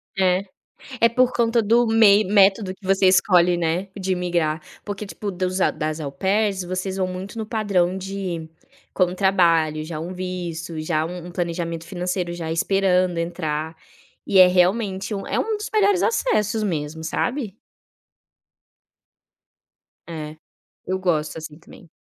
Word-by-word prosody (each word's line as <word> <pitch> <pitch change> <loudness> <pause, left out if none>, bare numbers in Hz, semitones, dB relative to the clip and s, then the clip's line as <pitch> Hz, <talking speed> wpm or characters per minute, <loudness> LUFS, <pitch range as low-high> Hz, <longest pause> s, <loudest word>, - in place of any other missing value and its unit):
É. 185 -1 +2 0.6
É 230 - +6
por 250 +2 +2
conta 235 -1 +2
do 230 +3 +3
mei 215 -2 +6
método 195 0 +3
que 190 - -17
você 195 0 +3
escolhe, 180 -2 +4
né, 170 +3 -1
de 190 0 -2
imigrar, 170 -3 -1 0.2
porque, 205 0 -5
tipo, 205 0 -5
dos 185 0 -2 0.2
das 155 +1 -2
au 140 -3 -4
pair, 205 +5 +1
vocês 185 +1 -3
vão 185 -1 0
muito 185 +5 -7
no 220 - -3
padrão 200 -5 0
de, 190 -4 -5 0.4
como 180 -1 +1
trabalho, 170 -5 +2
já 155 -1 -6
um 175 +3 -5
visto, 175 -3 -5
já 155 0 0
um 175 0 -7
um - - -9
planejamento 170 -1 -3
financeiro, 180 -1 -3
já 165 -2 -5
esperando 185 0 +1
entrar, 160 -2 -3 0.5
e 195 - +4
é 185 - +10
realmente 190 +2 +1
um 195 - -5
é - - -1
um 435 0 -1
dos 420 - -6
melhores 405 -3 +3
acessos 220 - +1
mesmo, 160 -4 -3
sabe? 235 - -2 2.5
É, 155 -1 -7 0.5
eu 185 - -1
gosto 160 -4 -1
assim 155 -1 -9
também. 170 0 -16
185 Hz, 145 wpm, -22 LUFS, 170-200 Hz, 2.5 s, é